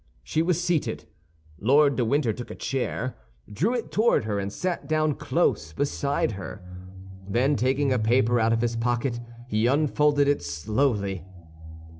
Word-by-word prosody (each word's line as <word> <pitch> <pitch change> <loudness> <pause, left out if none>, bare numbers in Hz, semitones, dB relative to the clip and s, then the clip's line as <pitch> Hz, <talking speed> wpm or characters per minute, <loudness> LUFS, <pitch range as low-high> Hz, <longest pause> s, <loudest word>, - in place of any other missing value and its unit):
She 155 - 0
was 170 0 +1
seated. 175 -3 -1 0.5
Lord 140 +5 +4
de 125 - +1
Winter 125 -1 +1
took 120 +3 -8
a - - -7
chair, 130 -1 -3 0.4
drew 205 - +1
it 240 - -4
toward 220 - +3
her, 105 -2 -2
and 100 0 -3
sat 180 - -3
down 155 -1 +2
close 75 - 0
beside 140 - 0
her. 95 -1 -8 0.7
Then 130 +7 +2
taking 135 +2 +1
a 125 - +1
paper 120 +2 +3
out 110 0 +2
of 115 0 +1
his 120 -1 0
pocket, 120 +1 -1 0.3
he 110 0 +1
unfolded 145 +1 +3
it 145 - +2
slowly. 100 - -1
125 Hz, 155 wpm, -25 LUFS, 110-145 Hz, 0.7 s, Lord